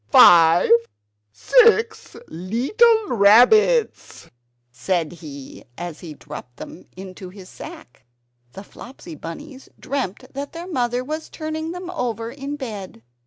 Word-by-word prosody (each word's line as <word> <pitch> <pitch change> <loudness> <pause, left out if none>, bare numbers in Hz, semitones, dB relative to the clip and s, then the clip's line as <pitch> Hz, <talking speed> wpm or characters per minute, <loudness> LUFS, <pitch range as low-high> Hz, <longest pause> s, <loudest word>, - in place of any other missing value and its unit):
five! 170 +1 +6 0.6
six 450 - +2
leetle 365 - +1
rabbits!" 250 - +3 0.4
said 160 +6 -2
he 145 -6 -11
as 175 -3 -7
he 160 -4 -10
dropped 135 -5 -11
them 170 - -11
into 185 -1 -10
his 185 0 -13
sack. 320 - -12 0.5
The 195 - -10
Flopsy 235 -4 -12
Bunnies 265 - -10
dreamt 255 -2 -5
that 280 +3 -6
their 335 +1 -7
mother 245 -6 -2
was 310 +4 -6
turning 315 +1 -5
them 360 0 -7
over 230 - -4
in 280 +2 -6
bed. 205 - -8
240 Hz, 120 wpm, -21 LUFS, -, 0.6 s, five